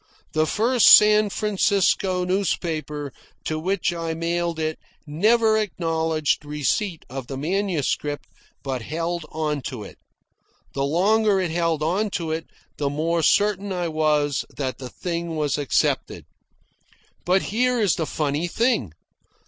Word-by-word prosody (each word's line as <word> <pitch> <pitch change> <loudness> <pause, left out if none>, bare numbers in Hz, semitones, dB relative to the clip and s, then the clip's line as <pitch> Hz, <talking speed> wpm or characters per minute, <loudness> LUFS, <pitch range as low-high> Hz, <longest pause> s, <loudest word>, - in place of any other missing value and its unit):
The 155 0 +2
first 235 +4 +3
San 210 0 +7
Francisco 195 -3 +1
newspaper 160 -6 -2 0.3
to 155 0 -2
which 180 +1 0
I 165 -1 -3
mailed 170 0 -1
it 155 0 -2 0.3
never 220 +8 +3
acknowledged 160 -6 -1
receipt 150 - -2
of 130 -1 -7
the 135 - -5
manuscript, 155 -3 -1 0.4
but 130 -3 -3
held 165 +5 -3
on 150 -2 -2
to 125 -5 -6
it. - - -12 0.7
The 140 0 -1
longer 200 +6 +3
it 180 -3 -1
held 165 -2 0
on 190 +7 0
to 165 -2 -4
it 160 +1 -3 0.3
the 145 -2 0
more 165 +4 0
certain 200 +3 +2
I 175 -2 -2
was 150 -3 +1
that 130 -2 -3
the 130 -2 -7
thing 170 +2 -4
was 150 -1 0
accepted. 145 - 0 1.0
And 185 +2 +3
here 250 +3 +1
is 205 -6 +3
the 160 - -2
funny 150 +2 -1
thing. 225 - 0
165 Hz, 135 wpm, -23 LUFS, 150-195 Hz, 1.0 s, San